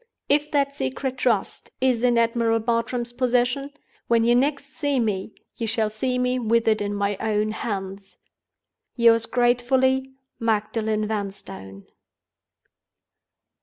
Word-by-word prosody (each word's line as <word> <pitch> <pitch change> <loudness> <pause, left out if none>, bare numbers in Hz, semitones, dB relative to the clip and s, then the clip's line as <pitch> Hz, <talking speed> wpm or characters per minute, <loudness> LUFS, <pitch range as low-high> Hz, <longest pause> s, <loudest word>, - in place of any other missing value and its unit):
If 295 +1 +2
that 280 -1 0
Secret 250 - -3
Trust 230 -7 0
is 255 -2 +1
in 245 -1 +3
Admiral 230 0 +2
Bartram's 235 +1 -1
possession—when 250 -1 -1
you 235 +1 +4
next 280 +2 0
see 285 -4 0
me, 210 -3 -2 0.2
you 230 - -2
shall 220 -1 0
see 250 +4 -1
me 250 0 +1
with 230 0 +1
it 215 -1 +3
in 205 0 -2
my 200 0 -1
own 215 0 0
hands. 195 -3 -5 0.8
"Yours 230 -1 +4
gratefully, 260 +2 +1 0.2
"MAGDALEN 215 -1 0
VANSTONE." 195 - -6
230 Hz, 120 wpm, -24 LUFS, 215-255 Hz, 0.8 s, you